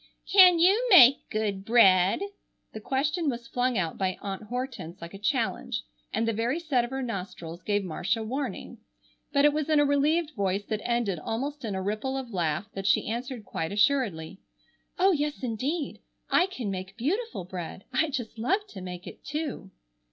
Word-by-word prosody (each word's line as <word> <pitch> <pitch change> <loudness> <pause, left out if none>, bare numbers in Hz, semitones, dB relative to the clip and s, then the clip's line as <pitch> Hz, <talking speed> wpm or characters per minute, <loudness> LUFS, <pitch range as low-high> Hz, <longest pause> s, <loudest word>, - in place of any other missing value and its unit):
"Can 365 -3 +9
you 395 +9 +4
make 275 - +7
good 205 -3 -2
bread?" 195 - +5 0.5
The 220 - -6
question 290 - 0
was 235 -2 -5
flung 245 0 0
out 170 -4 -2
by 185 -1 0
Aunt 195 0 -5
Hortense 230 -6 -5
like 170 +2 -9
a 195 - -9
challenge, 260 +7 -1 0.3
and 225 +1 0
the 230 - +1
very 235 +8 0
set 290 -8 +1
of 240 - -4
her 265 0 -3
nostrils 180 -6 -6
gave 205 -1 0
Marcia 190 +5 -1
warning. 265 +6 -4 0.5
But 280 0 +4
it 295 - +5
was 305 0 -2
in 305 -1 +4
a 290 - +5
relieved 295 +3 +2
voice 200 -1 -1
that 215 -2 -1
ended 235 -7 0
almost 275 - -4
in 210 -4 -3
a 190 - -3
ripple 215 +7 -2
of 250 -4 -6
laugh 165 -1 -1
that 195 0 -4
she 195 - +3
answered 240 0 -4
quite 160 +2 -3
assuredly: 205 - +1 0.6
"Oh, 380 +2 +5
yes, 295 -4 -1
indeed. 270 +7 -2 0.3
I 360 - +4
can 250 - -4
make 190 +2 -6
beautiful 375 - -2
bread. 180 +1 -7
I 310 +5 +2
just 240 -5 -5
love 390 - +1
to 190 - -9
make 180 -1 -7
it, - - -11
too!" 290 -9 -4
235 Hz, 180 wpm, -27 LUFS, 195-285 Hz, 0.6 s, Can